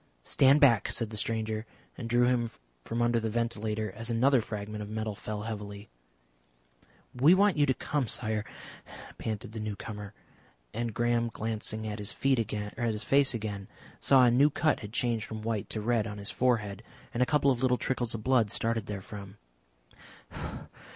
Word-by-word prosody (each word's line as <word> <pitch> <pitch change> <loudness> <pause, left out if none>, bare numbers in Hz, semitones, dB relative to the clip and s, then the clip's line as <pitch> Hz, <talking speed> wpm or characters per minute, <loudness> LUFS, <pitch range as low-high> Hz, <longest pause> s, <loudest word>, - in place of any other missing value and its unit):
"Stand 135 - +5
back," 125 -8 +5
said 115 -2 -2
the - - -6
stranger, 110 0 -1 0.3
and 115 -2 -6
drew 120 +1 +4
him 120 -2 +2 0.3
from 115 +1 -1
under 120 0 +3
the 110 0 -2
ventilator 110 -2 -1
as 115 +4 -6
another 125 +2 +4
fragment 105 0 -5
of 105 - -6
metal 110 0 -3
fell 105 +1 -5
heavily. 105 -2 -6 1.2
"We 145 +8 +6
want 200 0 +4
you 145 -1 +3
to 130 - +4
come, 145 -4 -1
Sire," 110 -2 -2 0.8
panted 110 -1 -4
the 110 - -6
newcomer, 105 -1 -6 0.6
and 115 +1 -2
Graham 120 +1 +1
glancing 110 0 -3
at 105 0 -4
his 105 +1 -3
face 115 +2 +1
again, 105 -3 -4 0.3
saw 135 -2 +5
a 120 - +6
new 140 +5 +5
cut 155 +1 +1
had 105 -2 -8
changed 115 -2 0
from 110 -1 -7
white 110 -3 -2
to 110 - -3
red 115 0 +1
on 105 -1 -6
his 100 0 -3
forehead, 110 -5 0 0.3
and 120 - -1
a - - +6
couple 145 -2 +3
of 125 -2 -1
little 125 -1 +3
trickles 120 -3 -1
of 110 - -6
blood 125 -4 +3
starting 115 0 -1
therefrom. 100 -1 -7
115 Hz, 165 wpm, -30 LUFS, 105-120 Hz, 1.2 s, We